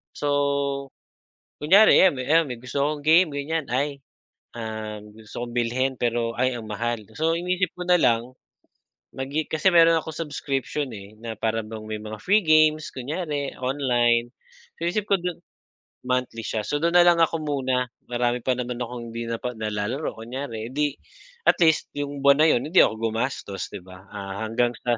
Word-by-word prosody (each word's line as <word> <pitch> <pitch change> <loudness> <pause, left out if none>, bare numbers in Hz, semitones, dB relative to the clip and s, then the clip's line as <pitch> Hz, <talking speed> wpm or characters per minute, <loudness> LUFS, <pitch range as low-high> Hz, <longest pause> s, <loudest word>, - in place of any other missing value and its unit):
So, 140 -1 0 0.7
kunyari 195 +8 +7
'yan, 185 -6 +5
'yan 155 +6 +3
may 125 -2 -6
gusto 130 +3 -2
kong 145 0 -2
game 160 +2 +5
ganiyan. 155 +2 -2
Ay, 140 +1 -1 0.5
ah, 110 -2 -5
gusto 105 +3 -8
kong 120 - -10
bilhin 125 +3 0
pero, 115 -1 0
ay 130 +1 +1
ang 115 - -8
mahal. 115 0 -3
So 160 +1 +2
inisip 180 0 -1
ko 180 - -4
na 180 0 +5
lang. 120 0 +2 0.8
Mag 135 0 -4
i 155 +1 0
kasi 160 +4 +2
meron 165 -1 +7
akong 160 -1 -5
subscription 140 0 -3
eh, 100 0 -10
na 115 0 -5
para 115 0 0
bang 110 0 -8
may 110 0 -3
mga 110 0 -7
free 205 +2 +3
games 155 0 +4
kunyari, 145 +1 -3
online. 120 -3 +1 0.5
Inisip 175 +5 0
ko 200 - +5
du 180 -1 -3 0.7
monthly 125 -3 -1
siya. 110 -2 -2
So 145 - -1
dun 170 +1 +1
na 175 - +8
lang 175 -1 +5
ako 165 0 +2
muna, 130 -4 0 0.2
marami 120 0 0
pa 130 - +3
naman 125 -1 -4
akong 120 0 -5
hindi 115 0 -4
napag 120 +1 -4
nalalaro 110 +7 -3
kunyari 115 -1 -6
'di 145 0 0 0.5
at - - +5
least 160 -1 +3
yung 145 -1 -4
buwan 140 +1 +6
na 160 - +6
yun 120 - +2
hindi 170 +5 +3
ako 110 0 0
gumastos, 115 -5 -3
'di 100 - -6
ba. 95 0 -13
Ah, 100 +1 -6
hanggang 120 +2 +1
sa 120 -1 +1
130 Hz, 175 wpm, -24 LUFS, 115-150 Hz, 0.8 s, na